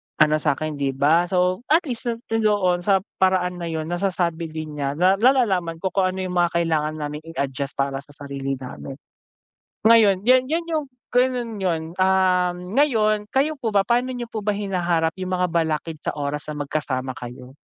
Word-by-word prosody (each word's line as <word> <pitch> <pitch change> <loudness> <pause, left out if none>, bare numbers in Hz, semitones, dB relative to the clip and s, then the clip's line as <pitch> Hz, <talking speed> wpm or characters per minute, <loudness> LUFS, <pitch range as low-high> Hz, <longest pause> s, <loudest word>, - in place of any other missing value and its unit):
ano 155 0 +4
sa'kin, 155 +2 -1
di 140 -1 0
ba, 160 +6 +3
so 180 0 +2
at 325 +4 +4
least 245 -2 -5
na 235 - -1 0.2
doon 205 -5 +2
sa 195 +2 +3 0.2
paraan 180 -1 +2
na 170 - -3
yun 160 -1 -2
nasasabi 175 -2 -1
din 155 -1 -6
niya 140 0 -1
na 185 +3 +4
nalalaman 210 -9 +3
ko 190 +2 -2
kung 190 -2 +2
ano 190 - -6
yung 180 -1 -4
mga 175 -1 +1
kailangan 155 -2 0
naming 150 0 -4
i - - -9
adjust 140 0 -3
para 135 0 -1
sa 145 - -19
sarili 140 -1 -4
namin. 130 +1 -8 0.9
Ngayon 210 -4 +5
yan 255 +1 +5
yun 335 +2 0
yung 315 -3 -1 0.3
ganun 245 -4 +1
yun 170 -4 0 0.2
ah, 185 -1 +3
ngayon 215 +1 +1
kayo 285 +4 +1
po 235 - -1
ba, 195 - +5
paano 245 +3 +2
niyo 240 - -4
po 220 - -3
ba 210 - 0
hinaharap 175 -5 0
yung 185 - -3
mga 180 0 +1
balakid 160 -1 -1
sa - - -1
oras 145 0 -3
na 150 -1 -3
magkasama 135 -3 -2
kayo? 125 +1 -9
180 Hz, 185 wpm, -23 LUFS, 150-210 Hz, 0.9 s, Ngayon